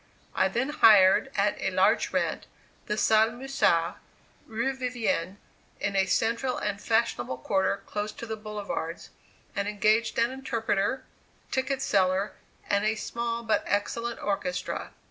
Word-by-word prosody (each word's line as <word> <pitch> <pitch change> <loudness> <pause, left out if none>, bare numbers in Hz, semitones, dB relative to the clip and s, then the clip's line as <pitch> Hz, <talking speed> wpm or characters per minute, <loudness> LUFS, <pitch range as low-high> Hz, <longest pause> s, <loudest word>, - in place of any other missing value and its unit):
I 190 - +3
then 240 +8 -1
hired 215 -4 +6
at - - +1
a - - +1
large - - +2
rent, - - -1 0.4
the 210 - -1
Salle 220 +1 +4
Musard, 240 -10 +1 0.5
Rue 235 +4 -1
Vivienne, 240 -8 -2 0.4
in 200 - -2
a 195 0 +3
central 230 +6 0
and 205 -1 -3
fashionable 220 - 0
quarter 190 +8 0
close 210 0 -3
by - - -8
the 220 -1 -4
boulevards, 210 -6 -5 0.4
and 200 0 -1
engaged 215 +2 +1
an 235 +2 +2
interpreter, 235 -3 -1 0.5
ticket 265 0 -1
seller, 190 +1 +1 0.3
and 200 0 +1
a 215 +1 +1
small 235 +1 -3
but 220 -1 +1
excellent 230 +3 -1
orchestra. 240 +7 -2
220 Hz, 135 wpm, -27 LUFS, 200-235 Hz, 0.5 s, hired